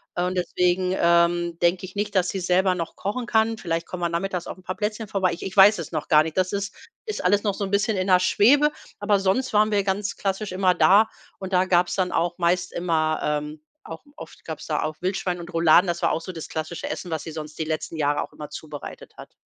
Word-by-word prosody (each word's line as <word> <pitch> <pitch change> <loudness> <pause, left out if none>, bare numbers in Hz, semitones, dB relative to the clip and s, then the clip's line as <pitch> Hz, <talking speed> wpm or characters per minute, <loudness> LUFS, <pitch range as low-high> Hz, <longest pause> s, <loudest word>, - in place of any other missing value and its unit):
Äh, 175 - 0
und 180 +1 -1
deswegen, 180 +1 0
ähm, 170 0 +2
denke 175 +2 +1
ich 185 +1 -12
nicht, 205 0 -3
dass 185 -1 +3
sie 195 - -3
selber 185 +1 +2
noch 170 -2 -5
kochen 210 +6 -3
kann. 225 -1 +1
Vielleicht 165 -4 -3
kommen 180 -1 -7
wir 170 - 0
nachmittags 180 +1 -3
auf - - -7
'n 185 - -18
paar 185 0 -4
Plätzchen 215 +1 -3
vorbei. 190 -2 0
Ich 170 - -7
ich 190 - -6
weiß 200 0 +7
es 160 - -6
noch 155 -3 -3
gar 155 0 +6
nicht. 160 +2 -6
Das 185 0 +1
ist 200 +1 -3 0.3
ist 430 -2 -4
alles 205 +3 +3
noch 205 -2 0
so 200 - -4
'n 195 - -4
bisschen 200 +1 +1
in 185 0 -1
der 185 -1 +5
Schwebe, 280 +11 +4 0.3
aber 205 -1 +2
sonst 195 +7 0
waren 215 +1 +3
wir 205 -1 +2
ganz 200 +2 -2
klassisch 195 0 -2
immer 185 -1 +2
da 205 +5 +5 0.3
und 190 0 -6
da 180 +1 +4
gab 175 -1 +3
es - - -3
dann 185 -2 0
auch 175 +1 -1
meist 180 +1 0
immer, 160 -3 0
ähm 150 0 -3 0.3
auch - - -8
oft - - -12
gab - - -6
es - - -10
da - - -1
auch 155 0 -4
Wildschwein 180 -1 -2
und 170 +1 -9
Rouladen. 165 +2 +5
Das 170 0 -2
war - - +2
auch - - 0
so 185 +3 -8
das 160 -2 -8
klassische 160 +2 -5
Essen, 180 - -5
was 160 -2 -3
sie 160 - -7
sonst 155 -1 -8
die 160 - -1
letzten 155 0 -4
Jahre 145 -1 0
auch - - -8
immer 150 -1 -9
zubereitet 150 -1 -9
hat. - - -12
180 Hz, 255 wpm, -24 LUFS, 170-195 Hz, 0.3 s, weiß